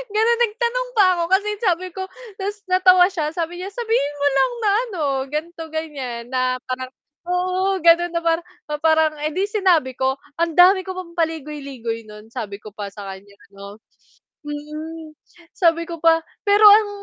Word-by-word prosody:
ganun 460 +2 +3
nagtanong 480 +3 -1
pa 400 - +7
ako 340 - 0
kasi 410 +2 +3
sabi 370 -3 +1
ko 380 - -4 0.4
Ta's 410 +2 -4
natawa 370 -1 +6
siya 315 -4 -3
sabi 340 +1 -3
niya 380 +2 -5
"Sabihin 445 - -1
mo 285 - +3
lang 485 - +3
na 420 - +2 0.2
ano 365 -7 -6 0.3
ganito 325 +2 -4
gan'yan 265 -7 -5
na 255 -1 0
parang" 255 0 -5 0.4
Oo, 370 +2 0
ganun 345 +1 +5
na 335 - -3 0.6
parang 315 -1 +3
edi 320 +6 -1
sinabi 370 - +2
ko. 265 +2 -1 0.2
Ang 335 0 0
dami 375 +2 +7
ko 375 0 -7
pang 340 -2 -8
paligoy-ligoy 280 -8 -3
nun. 210 +2 -13
Sabi 210 -5 -5
ko 210 -1 -13
pa 205 -2 -6
sa 200 0 -10
kan'ya 200 +1 -15 0.2
ano. 200 +1 -11 0.7
Hmm. 305 +1 -7 0.4
Sabi 335 -2 +2
ko 335 - -5
pa 330 0 +4 0.2
pero 410 +1 +4
ang 420 0 +7
330 Hz, 160 wpm, -21 LUFS, 270-375 Hz, 0.7 s, pa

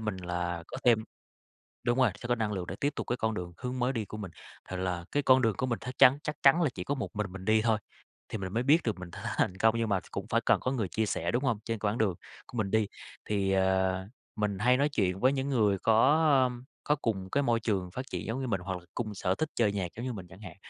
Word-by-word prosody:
mình 105 -3 -2
là 90 -1 -3
có - - -7
thêm 115 -3 +4 0.8
đúng 120 +1 +1
rồi, 130 -4 +5
sẽ 120 +3 -8
có 120 - +3
năng 110 -3 -1
lượng 95 -3 -3
để 95 - -5
tiếp 145 +1 +1
tục - - -3
cái 120 - -1
con 110 -2 -1
đường, 90 -3 -5
hướng 125 +1 -4
mới 125 +1 +1
đi 115 -4 -2
của 110 - -8
mình. 100 -5 -6 0.4
Thì 95 - -3
là 90 -2 -2
cái 145 - +2
con 130 -1 +5
đường 115 -3 +2
của 130 - -1
mình 115 -2 -1
thắc 125 +1 -7
chắn 130 +3 +7
chắc 150 -1 -3
chắn 150 +6 +6
là 155 - +3
chỉ 90 - -5
có 145 - -1
một 135 - -5
mình 105 -3 -2
mình 95 -1 -8
đi 110 +1 +3
thôi, 110 -2 +2 0.5
thì 110 - -4
mình 95 -2 -5
mới 115 +3 +1
biết 150 +6 +4
được 110 -5 -1
mình 90 -1 -8
th - - -11
thành - - -4
thành 95 - +1
công, 110 +3 +3
nhưng 115 - 0
mà 100 -2 +2
cũng - - -5
phải - - +3
cần - - +3
có 130 - -1
người 115 -7 -1
chia 110 +5 -1
sẻ, - - -1
đúng 125 +4 0
hông? 115 -5 +1
Trên 115 -2 -2
quãng 105 +2 -1
đường 105 -5 +2 0.3
của 120 - -8
mình 100 -3 0
đi, 110 0 +2 0.4
thì, 100 -2 0
ờ, 95 0 +2 0.3
mình 105 -2 -1
hay 125 +4 +4
nói 140 +2 +2
chuyện 95 -9 0
với 130 +4 +4
những 135 0 -1
người 105 -7 +2
có, 115 +7 +4 0.3
ơm, 125 0 -4 0.2
có 150 - +3
cùng 100 -9 -2
cái 140 - +2
môi 120 -4 +2
trường 95 -5 -1
phát 130 +8 -6
triển - - -4
giống 115 +4 -2
như 130 - -2
mình, 100 -6 -1
hoặc 95 0 -4
là 90 - -16
cùng 110 -4 -3
sở 95 -1 0
thích 155 +9 -2
chơi 110 -4 +2
nhạc 95 -3 -2
giống 115 - -5
như 130 - -2
mình 95 -6 -7
chẳng 95 +3 -14
hạn. 105 -4 -9
110 Hz, 290 wpm, -30 LUFS, 95-125 Hz, 0.8 s, chắn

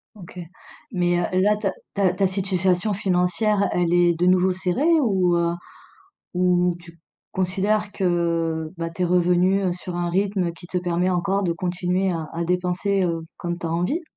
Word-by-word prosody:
OK. 180 -2 -11 0.5
Mais, 175 -3 +1
heu, 185 +1 0
là, 210 +2 +3
ta 200 -3 -1 0.2
ta 195 -3 +2
ta 195 +1 +1
situation 190 +1 0
financière 195 +2 +1
elle 175 -1 +1
est 175 -1 +4
de 170 +2 -1
nouveau 185 0 +4
serrée? 230 - +1
Ou, 185 -7 +2
heu, 170 0 +1 0.8
ou 180 -1 +2
tu 170 -1 -16 0.3
considères 200 +3 0
que, 170 -3 0
bah, 165 0 -3
tu 175 +2 -3
es - - +3
revenu 180 +2 +2
sur 180 0 -7
un 175 0 -1
rythme 190 -1 0
qui 170 +1 -14
te 180 - -2
permet 180 +1 0
encore 195 +2 0
de 170 -2 0
continuer 180 +2 -1
à 165 -2 -4
à 170 +1 -2
dépenser, 180 +3 0
heu, 165 -2 -1 0.2
comme 175 0 -4
tu 175 - -7
as 165 - -2
envie? 180 - 0
180 Hz, 175 wpm, -23 LUFS, 175-190 Hz, 0.8 s, est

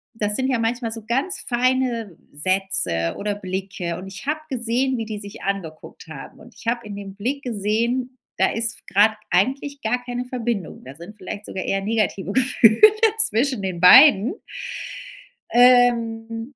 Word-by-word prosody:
das 210 -2 0
sind 260 +2 0
ja 255 -3 0
manchmal 230 0 -2
so 225 -1 -6
ganz 270 - -2
feine 245 -5 -1
Sätze 150 - 0
oder 210 0 -2
Blicke 185 -3 -5
und 190 - -9
ich 195 +7 -10
habe 305 +1 -1
gesehen 255 +1 -1
wie 225 - -4
die 215 -1 -6
sich 200 -1 -11
angeguckt 175 -6 -6
haben. 155 -4 -11
Und 235 +2 -17
ich - - -16
habe 235 0 -1
in 205 - -7
dem 200 -1 -9
Blick 255 +8 -3
gesehen: 235 +3 -2 0.2
Da - - +3
ist 230 0 -1
f - - -13
grad 210 +3 +4 0.2
eigentlich 270 +9 0
gar 245 +3 -1
keine 245 0 -4
Verbindung. 235 -7 -4
Da 130 - -10
sind 175 +7 -12
vielleicht 205 0 -8
sogar 190 - -5
eher 195 - -1
negative 205 -2 -1
Gefühle 235 -3 +3 0.5
zwischen 255 0 -1
den 185 -3 -4
beiden. 255 - +7 1.2
Ähm, 235 -1 +2
225 Hz, 165 wpm, -21 LUFS, 195-245 Hz, 1.2 s, beiden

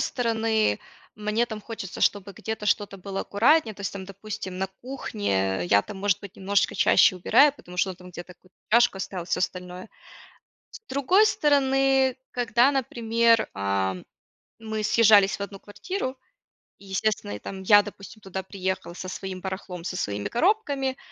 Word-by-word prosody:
стороны, 225 - 0 0.3
мне 215 +3 0
там 220 -2 -6
хочется, 210 -4 -7
чтобы 200 -1 +1
где-то 220 +2 -5
что-то 205 -1 0
было 195 +1 -5
аккуратнее. 230 +2 +3
То - - -14
есть - - -3
там, 195 -1 -7
допустим, 195 -1 -7
на 190 - 0 0.2
кухне 95 - -2
я 100 +3 +4
там 200 - -9
может 200 -1 +1
быть 200 -2 -11
немножечко 200 +1 +1
чаще - - +5
убираю, 280 +10 +5
потому 180 -10 -13
что 190 +2 +1
он 180 - -8
там 180 0 -13
где-то 175 +1 -10
какую-то 185 +1 -28
чашку 235 -3 +4
оставил, 185 -2 -5
всё - - -1
остальное. 180 +2 -4 0.8
С - - -10
другой 285 +10 +4
стороны, 270 - +3 0.2
когда, 245 +2 +3
например, 230 -3 +2
ам, 95 -2 -1 0.6
мы 220 -1 -4
съезжались 210 -3 +5
в - - -25
1 200 0 -7
квартиру 260 - -5 0.6
и 200 - -16
естественно, 195 - -1
я, 105 - -6
там 190 -1 -7
я 205 +1 +7
допустим, 205 +1 -11
туда 190 0 -5
приехала 190 -2 -4
со 185 +1 -7
своим 185 0 -6
барахлом, 190 -2 -6
со 185 - -4
своими 100 - -2
коробками, 280 - +1
205 Hz, 160 wpm, -25 LUFS, 185-235 Hz, 0.8 s, я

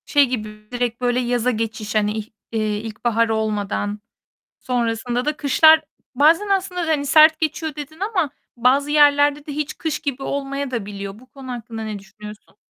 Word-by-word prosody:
Şey 285 -1 +4
gibi, 215 -3 -6
direkt 245 -1 -2
böyle 245 0 +1
yaza 245 0 +1
geçiş 220 -2 -4
hani, 210 -1 +2
ih 215 0 -5 0.2
eee, 215 -2 -1
ilkbahar 225 +1 -1
olmadan, 210 -1 -1 0.6
sonrasında 240 0 -1
da 300 0 -1
kışlar 315 +2 +6 0.3
Bazen 325 +9 +4
aslında, 380 -2 0
hani, 300 -3 0
sert 310 +2 +6
geçiyor 315 -1 -2
dedin 300 +2 -9
ama 385 -7 0 0.3
bazı 265 +4 +2
yerlerde 290 0 +4
de 295 - -5
hiç 300 0 -4
kış 315 -2 -2
gibi 275 -2 -4
olmayadabiliyor. 250 -9 -4
Bu 255 - -17
konu 265 -1 -9
hakkında 225 -2 -6
ne 215 -1 -4
düşünüyorsun? 210 +1 -13
250 Hz, 155 wpm, -21 LUFS, 220-295 Hz, 0.6 s, kışlar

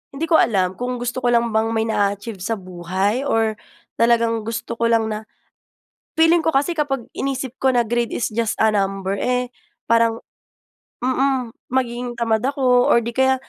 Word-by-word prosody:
hindi 300 - -4
ko 320 - +6
alam, 190 -3 +1
kung 250 0 -2
gusto 245 +1 -3
ko 245 - -1
lang 235 -1 +2
bang 220 +1 +1
may 220 - +1
na-a-achieve 205 -1 -1
sa 215 +5 -2
buhay? 190 +7 -2
Or 225 -3 +1 0.4
talagang 230 -1 +2
gusto 230 0 -4
ko 230 - +2
lang 225 -1 +2
na, 215 +1 -5 0.9
feeling 325 0 +4
ko 320 - +2
kasi 290 +5 +1
kapag, 270 -5 -2
inisip 265 -2 -3
ko 265 -1 +2
na 240 - +4
grade 235 +1 -1
is 235 - -1
just 225 0 -1
a 220 - +5
number, 195 -1 -1
eh, 250 +1 -1 0.4
parang, 230 0 +3 0.8
mm, 260 -1 0 0.2
magiging 245 -1 -2
tamad 225 -2 +1
ako 255 -3 +3
or 235 - +4
'di 235 - -3
kaya, 265 +2 +3
235 Hz, 175 wpm, -21 LUFS, 220-255 Hz, 0.9 s, ko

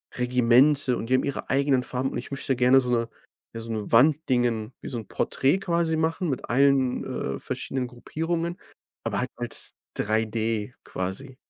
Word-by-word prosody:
Regimente. 125 +2 +4
Und 115 - -5
die 130 - +4
haben - - +2
ihre 140 - -4
eigenen 135 -1 +2
Farben, 130 +2 -2
und - - -4
ich - - -7
möchte 135 -1 -1
gerne 125 +2 +5
so 125 - -4
'ne 115 -1 +1 0.4
ja, 115 - -5
so 115 0 -6
'ne 110 -2 -4
Wand 140 +6 +6
Dingen, 120 -2 +1
wie - - -7
so 125 - -4
‘n 110 - -9
Porträt 140 +8 +1
quasi 170 -3 0
machen 165 +2 0
mit 135 - -3
allen, 135 0 +3
äh, 70 0 -3
verschiedenen 130 - -3
Gruppierungen, 165 +7 -3 0.5
aber - - -1
halt - - -1
als - - -4 0.3
3D 110 +1 -1
quasi. 95 +9 -5
125 Hz, 180 wpm, -26 LUFS, 115-140 Hz, 0.5 s, Wand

